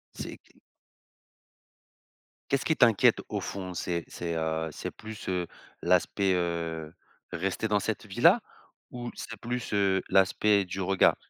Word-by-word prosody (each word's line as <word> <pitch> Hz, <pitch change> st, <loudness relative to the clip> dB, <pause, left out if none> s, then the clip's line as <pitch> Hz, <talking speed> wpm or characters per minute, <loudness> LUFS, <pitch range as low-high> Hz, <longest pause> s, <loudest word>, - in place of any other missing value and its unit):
C'est -, -, -6 dB
qu? -, -, -28 dB, 2.0 s
Qu'est-ce 140 Hz, -1 st, +1 dB
qui 160 Hz, -, +2 dB
t'inquiète 115 Hz, -7 st, +5 dB
au -, -, -1 dB
fond? 95 Hz, -2 st, -5 dB
C'est 85 Hz, -1 st, -2 dB
c'est 85 Hz, -1 st, -4 dB
heu, 80 Hz, 0 st, -1 dB
c'est -, -, -5 dB
plus, 110 Hz, 0 st, -9 dB
heu, 90 Hz, -2 st, -1 dB, 0.3 s
l'aspect, 90 Hz, +2 st, +2 dB
heu, 85 Hz, -2 st, -2 dB, 0.4 s
rester 95 Hz, +5 st, -1 dB
dans 105 Hz, -1 st, +2 dB
cette -, -, -3 dB
vie-là? -, -, +5 dB, 0.5 s
Ou 120 Hz, -1 st, -5 dB
c'est 115 Hz, -2 st, -7 dB
plus, 120 Hz, -1 st, -4 dB
heu, 95 Hz, -2 st, +3 dB
l'aspect 100 Hz, +1 st, +4 dB
du 95 Hz, +2 st, -4 dB
regard? 95 Hz, +1 st, +4 dB
95 Hz, 140 wpm, -29 LUFS, 85-105 Hz, 2.0 s, t'inquiète